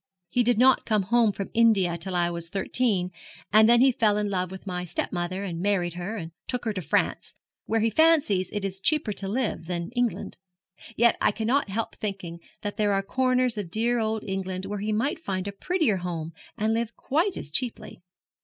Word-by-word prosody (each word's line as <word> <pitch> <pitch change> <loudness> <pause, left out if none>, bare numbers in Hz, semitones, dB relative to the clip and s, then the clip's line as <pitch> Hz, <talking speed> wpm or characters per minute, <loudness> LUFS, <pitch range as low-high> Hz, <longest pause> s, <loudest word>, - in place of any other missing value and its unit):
He 245 - +3
did 240 -1 +3
not 260 +2 +4
come 215 -3 +2
home 230 +2 +3
from 195 -1 -6
India 210 -7 +4
till 180 +2 -4
I 175 -1 +2
was 170 -1 -5
thirteen, 195 -1 0 0.4
and 215 +1 +7
then 240 0 +6
he 265 0 +6
fell 215 -4 +2
in 210 -1 -1
love 185 -2 -1
with 190 +1 -10
my 180 -2 -3
stepmother, 180 +2 -3
and 170 -4 -4
married 185 -4 0
her, 180 +6 -4
and 165 -4 -6 0.2
took 250 -1 -3
her 220 - 0
to 190 - -3
France, 155 - -1 0.3
where 225 0 +1
he 225 +1 +2
fancies 280 - +3
it 205 -1 -3
is 195 0 -5
cheaper 300 -7 +2
to 195 - -4
live 210 -6 -2
than 175 -1 -2
in - - -7
England. 245 -2 -2 0.6
Yet 235 +1 +4
I - - +4
cannot 230 +3 0
help 220 +3 -3
thinking 195 -5 -5 0.2
there 205 0 0
are 195 0 +1
corners 255 +1 +1
of 190 -5 -5
dear 235 +5 +1
old 220 -1 -1
England 190 -1 -4
where 205 +1 -4
he 210 +2 -2
might 230 +9 0
find 190 - -3
a - - -2
prettier 275 - 0
home 170 -3 -4 0.3
and 215 +1 +1
live 230 0 -2
quite 330 +8 0
as 145 - -6
cheaply.' 245 - -2
205 Hz, 205 wpm, -26 LUFS, 185-235 Hz, 0.6 s, and